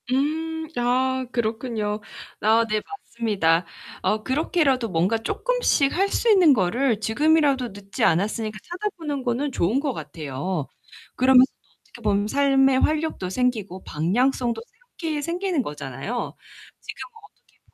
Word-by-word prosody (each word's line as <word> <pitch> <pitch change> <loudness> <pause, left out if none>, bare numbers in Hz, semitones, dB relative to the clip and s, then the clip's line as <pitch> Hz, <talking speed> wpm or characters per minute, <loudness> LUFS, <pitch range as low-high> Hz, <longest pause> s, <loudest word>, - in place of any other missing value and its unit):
음. 320 +4 -1
아 260 +2 +1
그렇군요. 220 -3 -2 0.4
아 225 +2 +4
네 215 0 0
맞습니다. 205 - 0 0.4
어 215 0 0
그렇게라도 270 -2 +1
뭔가 185 +5 +1
쪼끔씩 330 - +1
할 390 +2 +3
수 470 - +1
있는 365 -8 +7
거를 230 +3 +1
지금이라도 280 +3 +2
늦지 200 0 -6
않았으니까 215 +5 +1
찾아보는 345 -7 -4
거는 255 +3 -1
좋은 225 +3 +1
것 280 -2 -1
같아요. 150 - -4 0.5
그러면서 255 0 +6
또 - - -35
어떻게 235 - -16
보면 205 -1 +1
삶의 270 0 +3
활력도 305 - 0
생기고 210 -4 -1
방향성도 235 - 0
새롭게 325 - -6
생기는 345 0 -1
거잖아요. 150 - -5 0.4
지금 - - -9 0.2
어떻게 420 - -23
250 Hz, 305 characters per minute, -24 LUFS, 210-290 Hz, 0.5 s, 있는